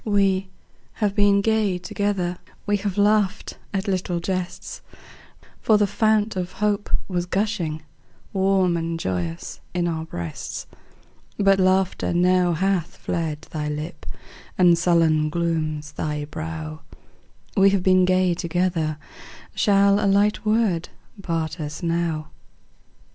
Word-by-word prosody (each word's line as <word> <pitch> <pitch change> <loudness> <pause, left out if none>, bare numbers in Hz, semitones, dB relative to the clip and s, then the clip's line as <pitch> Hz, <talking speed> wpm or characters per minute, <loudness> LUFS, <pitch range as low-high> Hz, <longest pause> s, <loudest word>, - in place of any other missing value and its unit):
We 195 -2 +1 0.4
have 210 -3 0
been 200 -1 +4
gay 215 -3 +1
together; 180 -1 -2 0.3
We 205 -1 +2
have 200 -1 -3
laughed 205 0 +1
at 195 +1 -2
little 185 -2 -1
jests; 180 0 -4 0.8
For 215 - +4
the 205 - +3
fount 215 +1 +1
of 180 -1 -3
hope 205 -1 -1 0.2
was 180 -2 -2
gushing 180 -6 -1 0.5
Warm 190 -2 +2
and 165 0 -3
joyous 90 - -3 0.2
in 175 -1 +1
our 160 -1 -2
breasts, 85 - -6 0.7
But 195 -1 +4
laughter 185 -1 +2
now 180 0 +3
hath 185 0 0
fled 160 -3 -3
thy 150 -1 -3
lip, 150 +4 -6 0.5
And 175 -2 +6
sullen 165 -3 +3
glooms 155 -2 -2
thy 150 -1 -3
brow; 80 - -6 0.7
We 195 0 +6
have 195 -2 +1
been 185 0 +5
gay 185 -1 +3
together, 170 -2 -1 0.6
Shall 200 0 +3
a - - +3
light 205 +2 +2
word 215 -6 +1 0.3
part 165 -2 -2
us 150 +2 -5
now? 165 -2 -1
180 Hz, 125 wpm, -23 LUFS, 165-200 Hz, 0.8 s, And